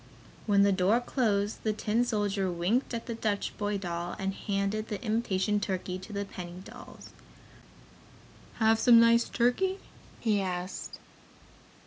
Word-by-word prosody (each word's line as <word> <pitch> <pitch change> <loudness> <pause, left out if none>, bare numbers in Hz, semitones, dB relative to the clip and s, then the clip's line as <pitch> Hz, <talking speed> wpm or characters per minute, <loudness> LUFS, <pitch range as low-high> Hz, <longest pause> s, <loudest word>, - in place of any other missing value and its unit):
When 200 -1 +5
the 200 - +4
door 190 +4 +3
closed, 215 -5 0
the 215 - 0
tin 220 +2 0
soldier 205 -5 0
winked 180 +10 0
at 230 -2 -4
the 235 - -4
Dutch 215 -3 -2
boy 205 -1 0
doll 175 -2 -4
and 195 -1 -2
handed 200 +2 -2
the 210 - -4
imitation 210 -3 0
turkey 185 -2 -3
to 190 +4 -11
the 200 0 -3
penny 180 -2 -8
dolls. - - -12 1.4
"Have 225 -1 +3
some 235 -1 +7
nice 230 0 +5
turkey?" 320 +11 +1 0.4
he 210 -3 +1
asked. 180 0 -4
205 Hz, 140 wpm, -29 LUFS, 190-230 Hz, 1.4 s, some